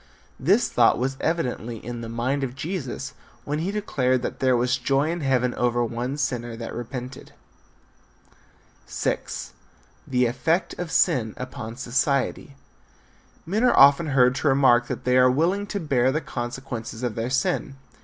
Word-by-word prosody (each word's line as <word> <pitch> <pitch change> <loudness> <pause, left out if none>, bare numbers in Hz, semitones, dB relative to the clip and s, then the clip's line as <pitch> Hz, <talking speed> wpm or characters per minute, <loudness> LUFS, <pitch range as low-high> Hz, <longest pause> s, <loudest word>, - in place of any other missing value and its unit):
This - - +3
thought - - +4
was 130 +2 -1
evidently 125 -8 -2
in 120 +2 -7
the 115 - -6
mind 130 +5 -1
of 130 -1 -4
Jesus 155 -3 -5 0.3
when 150 +1 -2
be 170 +4 -2
declared 130 -12 0
that - - -4
there 130 -2 +3
was 125 +1 +1
joy 135 +5 +1
in 170 0 -3
heaven 125 -3 +1
over 120 0 +1
one 120 +4 -3
sinner 120 -5 -2
that 115 0 -6
repented. 125 +2 -7 1.5
VI. - - -1 0.9
THE 125 -1 +2
EFFECT 130 +9 0
OF 175 -2 -3
SIN 110 -4 +2
UPON 120 -3 -7
SOCIETY. 135 +2 -1 0.9
Men 210 +7 0
are 250 - +4
often 140 +4 +7
heard 125 -3 +4
to 145 - 0
remark 130 -3 +4
that - - -5
they 125 0 +3
are 125 0 +6
willing 175 +10 +1
to 200 - -3
bear 130 -6 +2
the 155 - 0
consequences 120 -3 -6
of 120 -3 -1
their 115 +2 -3
sin. 130 +1 -1
130 Hz, 155 wpm, -24 LUFS, 120-140 Hz, 1.5 s, often